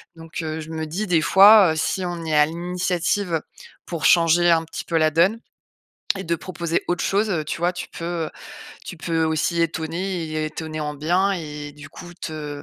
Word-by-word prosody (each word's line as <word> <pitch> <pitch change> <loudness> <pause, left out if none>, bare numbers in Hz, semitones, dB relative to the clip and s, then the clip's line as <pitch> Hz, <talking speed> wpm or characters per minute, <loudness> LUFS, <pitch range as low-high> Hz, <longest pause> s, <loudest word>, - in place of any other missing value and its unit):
donc, 165 0 -8
heu, 160 0 -4
je 155 - -9
me 160 -1 -3
dis 190 +8 -3
des 175 -3 +3
fois, 195 0 +7
heu, - - -5
si 185 +4 -1
on 175 -1 -4
est 155 -1 0
à 150 - +6
l'initiative 175 +1 -1 0.4
pour 170 -3 -4
changer 175 0 +5
un 165 -1 +3
petit 165 - -7
peu 165 - 0
la 155 -1 +3
donne 180 +8 +3 0.8
et 195 - -6
de 170 +1 0
proposer 170 -1 -3
autre 175 0 0
chose, 205 +2 +1
heu, 155 -4 -1
tu 155 - -4
vois? 175 +1 +1
Tu 180 - -6
peux 165 -2 -4 0.6
tu 175 - -8
peux 165 0 -1
aussi 160 +2 0
étonner 170 +3 -2
et 155 0 -3
étonner 155 0 -6
en 150 0 -3
bien 175 +7 +1
et 150 -4 -6
du 145 +1 -12
coup 175 +2 -11
te 150 -4 -6
165 Hz, 200 wpm, -22 LUFS, 155-180 Hz, 0.8 s, fois